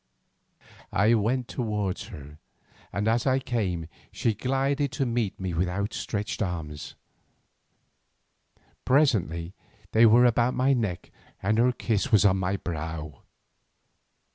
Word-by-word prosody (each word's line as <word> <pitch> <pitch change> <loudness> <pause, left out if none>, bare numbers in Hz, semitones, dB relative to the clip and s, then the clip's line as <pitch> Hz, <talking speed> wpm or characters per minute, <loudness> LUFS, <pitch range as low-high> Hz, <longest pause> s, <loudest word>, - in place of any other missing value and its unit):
I 105 +4 +3
went 120 +3 +1
towards 105 -6 -2
her, 75 +1 -11 0.5
and 100 +3 -1
as 115 +4 +1
I 130 0 +4
came 105 -10 -2 0.3
she 115 - 0
glided 135 +4 0
to 135 +1 0
meet 115 -4 -1
me 95 -2 -3
with 90 +2 0
outstretched 100 +2 -3
arms. 80 -6 -4 1.9
Presently 95 - +2 0.4
they 115 +1 +6
were 120 +3 +6
about 120 +1 +2
my 130 +2 +3
neck 105 -8 -2 0.3
and 105 +3 +2
her 125 +2 +4
kiss 110 -5 -1
was 105 -2 +5
on 95 -1 +4
my 95 +1 -1
brow. 80 -4 -5
105 Hz, 120 wpm, -27 LUFS, 90-120 Hz, 1.9 s, they